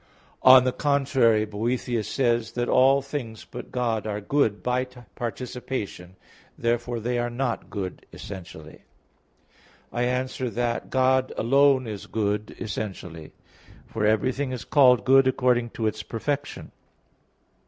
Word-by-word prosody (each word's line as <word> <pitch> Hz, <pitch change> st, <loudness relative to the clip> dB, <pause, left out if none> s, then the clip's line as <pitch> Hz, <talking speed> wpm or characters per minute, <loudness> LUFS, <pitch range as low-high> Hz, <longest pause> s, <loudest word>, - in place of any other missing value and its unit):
On 130 Hz, 0 st, +8 dB
the 130 Hz, -, +1 dB
contrary, 130 Hz, -6 st, +2 dB
Boethius 115 Hz, +2 st, -2 dB
says 120 Hz, -3 st, 0 dB
(De 120 Hz, -, -2 dB
Hebdom.), -, -, +1 dB
that -, -, -6 dB
"all 135 Hz, +2 st, +5 dB
things 125 Hz, -6 st, -6 dB
but -, -, -9 dB
God 115 Hz, -3 st, -1 dB
are 105 Hz, -1 st, -2 dB
good 110 Hz, -1 st, 0 dB
by 125 Hz, +1 st, 0 dB
participation." 120 Hz, -5 st, -6 dB, 0.4 s
Therefore 120 Hz, 0 st, -1 dB
they 120 Hz, +2 st, -1 dB
are 120 Hz, 0 st, -1 dB
not 120 Hz, 0 st, -3 dB
good 95 Hz, -4 st, -6 dB
essentially. 85 Hz, -5 st, -10 dB, 1.1 s
I 120 Hz, -, -1 dB
answer 125 Hz, 0 st, -1 dB
that, 120 Hz, 0 st, -2 dB
God 130 Hz, 0 st, +2 dB
alone 135 Hz, +2 st, +4 dB
is 105 Hz, -3 st, -7 dB
good 105 Hz, 0 st, -2 dB
essentially. 90 Hz, -7 st, -6 dB, 0.5 s
For 110 Hz, -, -4 dB
everything 130 Hz, +6 st, +1 dB
is 125 Hz, -5 st, -5 dB
called 125 Hz, -4 st, +5 dB
good 135 Hz, 0 st, +6 dB
according 125 Hz, -2 st, +2 dB
to 115 Hz, -, -1 dB
its 110 Hz, 0 st, -1 dB
perfection. 140 Hz, +7 st, -4 dB
120 Hz, 130 wpm, -25 LUFS, 110-130 Hz, 1.1 s, On